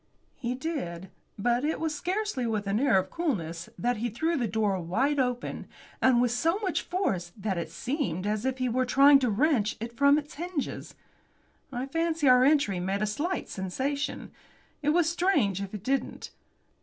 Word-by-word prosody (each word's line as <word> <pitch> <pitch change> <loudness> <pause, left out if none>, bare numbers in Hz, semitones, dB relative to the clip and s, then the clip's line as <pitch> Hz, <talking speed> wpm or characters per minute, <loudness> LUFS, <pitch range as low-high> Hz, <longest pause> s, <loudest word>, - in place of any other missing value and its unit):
He 250 -1 -3
did. 220 - -4 0.3
But 240 +4 +1
it 310 +2 0
was 320 -1 -1
scarcely 360 - -2
with 215 -2 -1
an 200 +2 0
air 260 -7 +4
of 190 0 -1
coolness 170 - -2
that 245 0 0
he 235 +3 -1
threw 320 +10 -1
the 245 -6 0
door 210 -3 0
wide 245 - 0
open, 250 -1 -2 0.3
and 255 -2 +5
with 245 -1 +2
so 325 +9 +1
much 390 -5 -1
force 190 - -2
that 195 -3 -2
it 170 - -4
seemed 240 - -3
as 210 +1 -1
if 260 0 -1
he 255 -1 0
were 250 +2 +1
trying 275 +3 +6
to 255 -3 +1
wrench 225 -1 +1
it 235 +2 -6
from 280 +3 +5
its 295 -1 -5
hinges. 345 -2 -5 0.8
I 250 0 -3
fancy 325 +1 0
our 250 0 +7
entry 275 -10 +3
made 195 +3 -1
a - - +3
slight 295 - -2
sensation. 265 +10 -3 0.5
It 295 - +1
was 330 +1 +3
strange 315 - +1
if 195 -1 -5
it 210 -3 -7
didn't. 270 +3 -2
255 Hz, 180 wpm, -28 LUFS, 210-295 Hz, 0.8 s, our